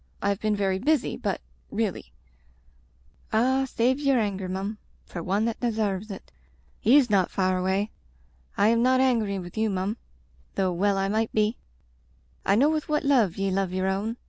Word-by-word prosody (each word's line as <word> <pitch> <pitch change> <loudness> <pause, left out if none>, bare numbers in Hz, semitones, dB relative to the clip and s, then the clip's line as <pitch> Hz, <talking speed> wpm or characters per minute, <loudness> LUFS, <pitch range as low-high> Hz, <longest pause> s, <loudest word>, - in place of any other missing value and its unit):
I 200 - 0
have 200 -1 0
been 215 -1 0
very 195 -2 0
busy, 295 +4 +1
but - - -3 0.2
— - - -36
^really - - -2 0.7
" - - -35
"Ah, 260 +4 +3
save 255 +4 +1
yer 275 -3 +2
anger, 195 -4 -1
mum, 195 +3 -4 0.3
for 175 - -6
one 195 +5 0
that 230 -1 -2
desarves 215 -4 -1
it. 195 - -9 0.5
He's 260 +4 +5
ndt 195 -5 +2
far 185 -1 +1
away. 190 +3 0 0.7
I 205 - +4
am 230 0 +3
not 255 +1 +4
angry 230 -6 +2
with 180 +3 -6
you, 220 0 +2
mum, 195 +3 -2 0.6
though 185 -2 +1
well 200 +3 +1
I 195 0 +1
might 220 +2 0
be. 215 +1 +2 0.9
I - - +5
know 280 +8 +4
with 310 -1 -2
what 300 0 +1
love 245 - +3
ye 195 0 0
love 190 -1 -1
yer 185 0 -1
own. 200 +5 -1
205 Hz, 185 wpm, -26 LUFS, 190-235 Hz, 0.9 s, He's